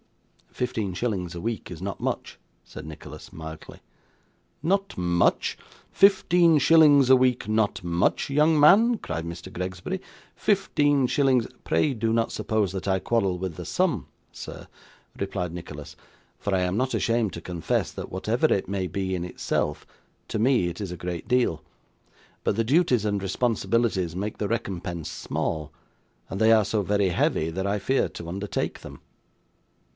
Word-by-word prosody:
'Fifteen 110 -6 -2
shillings 95 -5 -2
a - - -5
week 115 +4 -4
is 85 -1 -8
not 100 +1 -4
much,' - - -3 0.3
said - - -10
Nicholas, 80 -1 -10
mildly. 80 -1 -9 0.8
'Not 195 +5 0
much! 85 -1 +1 0.3
Fifteen 180 -4 +5
shillings 145 -3 +6
a 130 - +9
week 125 -4 +2
not 110 -3 0
much, 85 +7 +1
young 150 +2 +3
man?' 215 +11 +6
cried 80 - -5
Mr 85 0 -8
Gregsbury. 90 +1 -4 0.3
'Fifteen 145 -3 +2
shillings 130 -3 +2
a - - -10
' - - -41
'Pray 80 - +1
do 115 -1 -1
not 115 0 +1
suppose 110 -4 0
that 95 +1 -4
I 95 -1 +2
quarrel 100 -4 0
with 90 -2 -4
the - - -6
sum, - - 0 0.2
sir,' - - -9 0.5
replied 95 -3 -3
Nicholas; 80 -4 -8 0.4
'for 100 - -3
I 95 - +2
am 90 +1 0
not 130 +2 0
ashamed 115 -3 +1
to 85 - -7
confess, 85 -2 -2
that - - -7
whatever - - +1
it - - +1
may 95 -1 -2
be 95 +2 -2
in 90 - -3
itself, 75 -4 -2 0.4
to - - -3
me 120 -5 +3
it 85 +3 -5
is 95 -3 -4
a 90 - -6
great 90 -1 -5
deal. 120 -11 +1 0.8
But - - +1
the 115 - +1
duties 125 - +2
and 100 -2 0
responsibilities 105 -3 0
make 105 +3 -4
the 105 - -1
recompense 90 -7 -3
small, 75 -2 -3 0.6
and 95 - -4
they 110 +1 +6
are 110 -2 +5
so 105 +1 0
very 100 0 +1
heavy 80 -2 +1
that 95 +3 -2
I 100 +1 0
fear 130 +7 +1
to 85 - -9
undertake 100 +3 -3
them. - - -10
100 Hz, 165 wpm, -25 LUFS, 90-125 Hz, 0.8 s, a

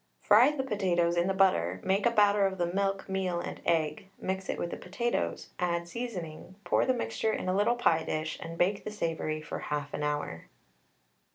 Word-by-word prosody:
Fry 225 +6 +6
the 295 -3 -2
potatoes 180 -8 +1
in 175 +1 +2
the 195 - +1
butter, 95 - +3
make 195 +4 +2
a - - +5
batter 205 -3 +4
of 190 0 -4
the 175 - +1
milk, 195 +2 -1
meal, 190 -2 -1
and - - -6
egg, 160 0 +1
mix 190 0 -3
it - - -1
with 170 - -3
the - - -3
potatoes, 185 - -2
add 170 -1 0
seasoning, 185 -5 -6
pour 175 - +2
the 260 - +4
mixture 115 - -1
in - - -3
a 185 - +1
little 215 +5 +3
pie 165 -9 +3
dish, 155 0 -3
and 165 0 -7
bake 195 +4 +1
the - - -4
savoury 165 -6 -2
for - - -5
half 145 -1 -4
an - - -3
hour. 145 - -3
180 Hz, 200 wpm, -30 LUFS, 160-200 Hz, -, Fry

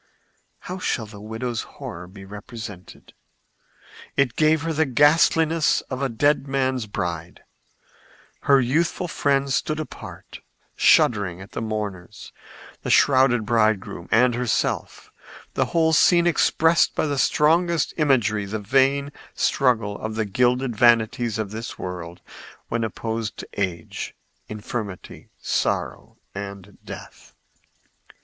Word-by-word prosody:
How 185 +1 -6
shall 115 -10 -1
the 105 -1 -12
widow's 110 +2 -4 0.2
horror 85 +1 -7
be 95 +1 -12
represented? 105 -1 -10 1.0
It 140 -4 +2
gave 155 0 +3
her 165 0 -1
the 160 0 +1
ghastliness 155 +3 +3
of 130 +1 -3
a 135 - 0
dead 145 +4 +1
man's 130 -3 -1
bride. 85 -4 -5 1.0
Her 140 -1 +6
youthful 160 +8 0
friends 140 -4 0
stood 155 +3 -1
apart, 155 - -9 0.4
shuddering 100 -6 +3
at 95 +1 -11
the - - -4
mourners, 105 -5 -5 0.5
the - - -5
shrouded 130 -5 +4
bridegroom 110 -6 0
and 125 +2 +4
herself; 120 -2 -2 0.4
the - - +1
whole 160 -1 +2
scene 170 +2 +5
expressed 165 -1 +3
by - - +1
the 145 -2 -1
strongest 165 +3 +2
imagery 115 -9 +2
the 105 +2 -4
vain 135 +6 +2 0.2
struggle 115 -6 +1
of 110 0 -4
the 110 -1 0
gilded 125 +4 +1
vanities 115 0 +3
of 110 -3 -3
this 115 +2 -6
world 90 -1 -7 0.5
when 115 -1 -1
opposed 110 0 -4
to - - -8
age, 90 -5 -4 0.3
infirmity, 105 -2 -6
sorrow - - -2 0.2
and 100 -1 -8
death. - - -11
120 Hz, 120 wpm, -23 LUFS, 105-140 Hz, 1.0 s, Her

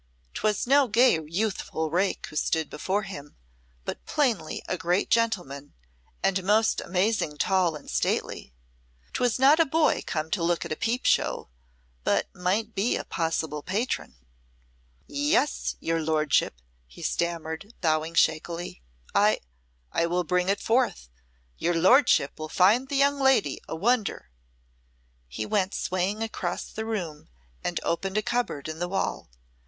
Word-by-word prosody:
'Twas 210 -1 0
no 275 +1 +5
gay 235 -5 +4
youthful 170 -3 -2
rake 185 +3 0
who - - -12
stood 160 0 0
before 195 +7 -1
him, 145 -7 -9 0.5
but - - -5
plainly 245 - 0
a - - -1
great 175 +2 0
gentleman, 175 -12 0 0.5
and 195 -1 +1
most 215 +3 +3
amazing 180 -4 0
tall 180 -1 +2
and 150 - -11
stately. - - -1 0.6
'Twas 245 -2 +1
not 275 +5 +6
a - - +7
boy 315 +2 +2
come 155 0 -2
to 190 - 0
look 170 0 +1
at - - -7
a - - 0
peep 240 +8 -1
show, - - +1 0.5
but - - +1
might 200 +5 -1
be 205 +5 +1
a - - -3
possible 160 -3 -2
patron. 205 - -2 0.9
"Yes, 295 +2 0
your 165 0 -1
lordship," 155 - +1 0.3
he - - -12
stammered, 170 +4 -3
bowing 160 0 0
shakily, 165 - 0 0.3
"I - - +4 0.5
I 170 - +1
will 180 +1 0
bring 180 +2 +1
it 200 - +1
forth. 230 - 0 0.5
Your 175 0 +1
lordship 185 - +4
will 155 0 -5
find 215 +11 +4
the 280 - 0
young 280 +1 +3
lady 265 - +3
a - - -4
wonder." 215 - 0 1.0
He 65 - -5
went 195 - 0
swaying 185 +4 -1
across 185 -5 -4
the 220 0 -5
room, 175 - -4 0.3
and - - -1
opened 190 +4 -1
a 215 - +1
cupboard 235 -14 -2
in 155 0 -6
the 175 0 -2
wall. 195 - -2
185 Hz, 145 wpm, -27 LUFS, 160-225 Hz, 1.0 s, a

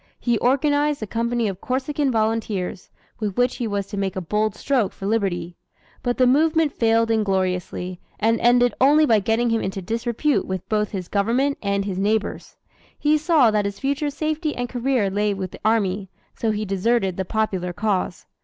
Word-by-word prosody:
He 235 -3 +1
organized 290 +1 +2
a - - -1
company 235 +1 -1
of 195 -2 -5
Corsican 275 +2 -1
Volunteers, 215 -5 -1 0.3
with 210 -3 -3
which 245 0 +2
he 240 - -2
was 200 -2 -2
to 200 +1 -7
make 195 -2 -2
a - - -1
bold 210 +4 -1
stroke 255 -8 0
for 195 - -8
liberty. 185 -5 -1 0.4
But 245 -1 -1
the 255 - +4
movement 310 +3 +3
failed 230 0 +2
ingloriously, 185 -3 -1 0.2
and 225 +2 +2
ended 245 0 +4
only 295 +3 +6
by 225 -6 +4
getting 225 +4 +1
him 225 - +1
into 195 +1 -3
disrepute 235 +8 -1
with 190 -1 -4
both 210 -2 0
his 185 -4 -5
Government 240 +8 +1
and 200 -1 0
his 190 -2 -3
neighbors. 210 +2 -1 0.4
He 300 +1 +3
saw 305 -6 +4
that 210 -1 +1
his 200 0 -3
future 280 +2 -1
safety 310 +1 -2
and 245 0 -2
career 245 -5 0
lay 205 +1 0
with 190 -2 -5
the - - -12
army, 200 -3 +1 0.2
so 225 - -2
he 215 0 -1
deserted 195 0 +1
the 190 - -2
popular 190 -3 -1
cause. 190 -2 -2
220 Hz, 180 wpm, -22 LUFS, 195-250 Hz, 0.4 s, only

